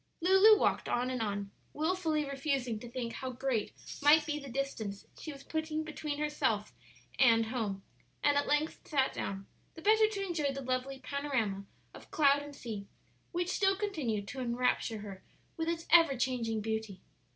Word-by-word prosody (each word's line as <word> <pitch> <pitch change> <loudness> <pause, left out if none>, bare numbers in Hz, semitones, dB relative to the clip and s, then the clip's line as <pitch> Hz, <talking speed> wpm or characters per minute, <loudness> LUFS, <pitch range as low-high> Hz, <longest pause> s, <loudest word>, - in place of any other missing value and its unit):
Lulu 385 +5 +7
walked - - +1
on 250 +1 0
and 255 -2 -2
on, 200 -2 -2 0.2
wilfully 315 -1 0
refusing 275 -5 -1
to 240 - -9
think 240 -1 -4
how 260 - -4
great 255 -3 -1 0.3
might 300 +2 +6
be 300 -1 -2
the 280 -2 -9
distance 230 -6 -4
she 315 - -6
was 275 -1 -11
putting 315 0 -2
between 305 -1 -4
herself 295 -8 0 0.5
and 230 -3 +6
home, 220 -5 -3 0.4
and 290 -1 +4
at 285 - +1
length 295 +2 +1
sat 270 -4 +1
down, 195 0 -4 0.3
the 325 - -10
better 435 +2 +5
to 400 -2 -3
enjoy 315 -6 0
the 275 0 -5
lovely 255 +1 -2
panorama 260 -8 -2 0.3
of - - -13
cloud 285 -2 +4
and 290 0 -9
sea 215 -7 -6 0.4
which 350 0 -1
still 390 0 +2
continued 290 - -2
to 265 - -5
enrapture 240 -2 0
her 195 -2 -9 0.3
with 325 -1 -2
its 330 -1 -2
ever 330 -6 +6
changing 235 -4 -1
beauty. 220 -2 -3
275 Hz, 170 wpm, -32 LUFS, 230-310 Hz, 0.5 s, Lulu